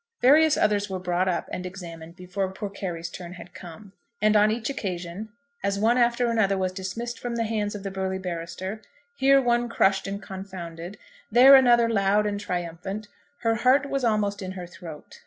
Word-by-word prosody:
Various 300 +4 +5
others 205 -1 +1
were 190 - -3
brought 180 0 0
up 180 - -1
and 180 - -4
examined 170 -3 -9
before 185 +1 -3
poor 195 +1 -6
Carry's 175 -4 -5
turn 175 0 -9
had 180 0 -12
come; 180 +4 -11 0.3
and 215 0 +3
on 210 0 +5
each 225 +1 -2
occasion, 190 -5 -5 0.3
as 200 0 0
one 225 +4 +3
after 240 0 +2
another 200 -4 +2
was 185 -1 0
dismissed 200 +6 -5
from 240 -1 -4
the 230 - 0
hands 215 -2 -2
of 200 - -7
the 195 - -4
burly 190 0 -2
barrister, 185 +3 -5 0.3
here 275 - +5
one 240 -2 +1
crushed 195 -4 +2
and 200 0 -4
confounded, 185 -2 -8 0.3
there 260 +3 +8
another 240 -3 +6
loud 205 -1 +2
and 205 -1 -2
triumphant, 180 +3 -5 0.3
her 230 -1 +2
heart 260 +5 +3
was 275 -1 -1
almost 210 -3 0
in 185 0 -5
her 180 -2 -7
throat. 170 -3 -11
200 Hz, 185 wpm, -25 LUFS, 185-230 Hz, 0.3 s, there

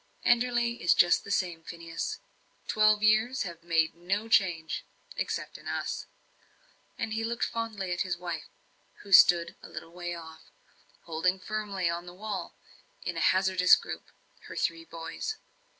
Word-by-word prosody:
"Enderley 240 -1 +2
is 175 - +4
just 175 - +5
the - - -10
same, 175 -4 0
Phineas. 170 - -5 0.5
Twelve 215 0 +4
years 220 +5 +3
have 170 -3 -8
made 165 -2 +2
no 195 +6 -2
change 175 -7 +2 0.3
except - - -3
in - - -12
us." - - -3 0.9
And 225 -1 -2
he 225 0 -1
looked 235 +1 -1
fondly 220 -5 -3
at 175 - -1
his 180 -2 -1
wife, 175 -3 -5 0.5
who 200 - -12
stood 170 -2 +7
a - - -11
little 165 - -8
way 175 0 -5
off, 160 -1 -11 0.5
holding 175 +3 0
firmly 205 -3 -2
on 170 +1 -2
the 175 - -10
wall, 200 -3 -5 0.5
in - - -3
a - - -2
hazardous 185 -1 +5
group, - - -7 0.4
her - - -8
three 165 -1 -1
boys. 165 - -5
185 Hz, 150 wpm, -29 LUFS, 170-215 Hz, 0.9 s, stood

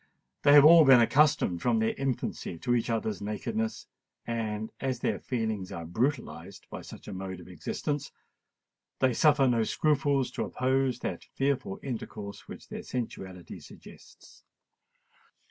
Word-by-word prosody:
They 145 - +6
have 145 0 +9
all 165 +1 +9
been 135 -3 +8
accustomed 120 - +3
from 120 -2 +2
their 110 0 +1
infancy 130 -9 -3
to 120 +9 -1
each 120 0 0
other's 110 -4 -2
nakedness; 110 +2 -3 0.4
and, 110 -2 -3
as 130 -3 -2
their - - 0
feelings 110 -6 -3
are 85 -1 -6
brutalised 95 - -3
by - - -6
such - - -12
a - - -6
mode 95 -1 -6
of 90 - -13
existence, 135 - -4 0.9
they 130 -1 +2
suffer 145 +1 +4
no 120 -3 +3
scruples 140 0 +1
to - - -3
oppose 130 -1 0
that - - -4
fearful 135 -7 -1
intercourse 110 -5 -6
which - - -10
their - - -6
sensuality 95 -7 -6
suggests. - - -16
115 Hz, 145 wpm, -29 LUFS, 100-135 Hz, 0.9 s, have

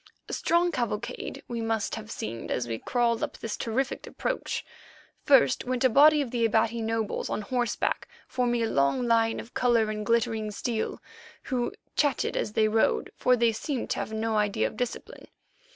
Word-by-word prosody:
A - - -6
strange 345 +1 +2
cavalcade 235 -3 -3
we 235 -1 -3
must 225 -2 -1
have 220 -1 -6
seemed 115 - -5
as 120 -1 -1
we 115 -1 -3
crawled 235 -2 +1
up - - -3
this 225 -2 -4
terrific 250 +4 -2
approach. - - -3 0.6
First 270 -3 +5
went 255 +1 -1
a 260 - +6
body 295 +5 +6
of 245 - -8
the 240 -2 0
Abati 225 +1 +2
notables 225 -1 -2
on - - -2
horseback, 245 +1 -1 0.2
forming 240 -2 0
a - - +1
long 140 - +1
line 225 -1 +3
of 235 - -10
colour 230 -3 +2
and 210 0 -4
glittering 225 -1 +1
steel, 220 +2 -3 0.4
who 245 -3 -1 0.2
chattered 290 -4 +1
as 210 - -1
they 215 0 +3
rode, 220 +1 +1
for 250 - +3
they 235 -1 +3
seemed 250 +3 -3
to - - 0
have - - -4
no 220 0 -1
idea 205 - +1
of 110 - -3
discipline. 245 -1 -5
230 Hz, 180 wpm, -27 LUFS, 220-245 Hz, 0.6 s, a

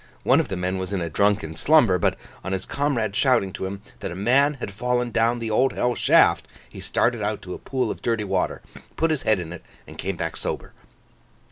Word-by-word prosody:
One - - +4
of - - 0
the 95 - -4
men 90 +1 -2
was 95 +1 -4
in 100 - 0
a 85 -2 -3
drunken 100 -2 +1
slumber, 120 - +4
but - - +1 0.3
on 95 - -3
his 95 0 -3
comrade's 120 -8 -1
shouting 105 -8 +2
to 95 - -4
him 100 +1 -7 0.2
that - - -4
a 85 - -6
man 135 +9 +3
had 125 -6 -6
fallen 125 +2 -1
down 115 +2 +2
the 115 -2 -4
Old 130 +5 +2
Hell 125 0 0
Shaft, - - +4 0.2
he - - -12
started 120 -2 0
out 105 0 -2
to 90 - -6
a - - -7
pool 130 -2 -2
of - - -7
dirty 115 -2 0
water, 95 -2 -1 0.3
put 165 0 +2
his 150 -4 0
head 110 -3 +2
in 85 -1 -6
it, 90 - -10 0.2
and - - -13
came 95 +2 -2
back 80 -1 -3
sober. - - -4
105 Hz, 230 wpm, -24 LUFS, 95-125 Hz, 0.3 s, One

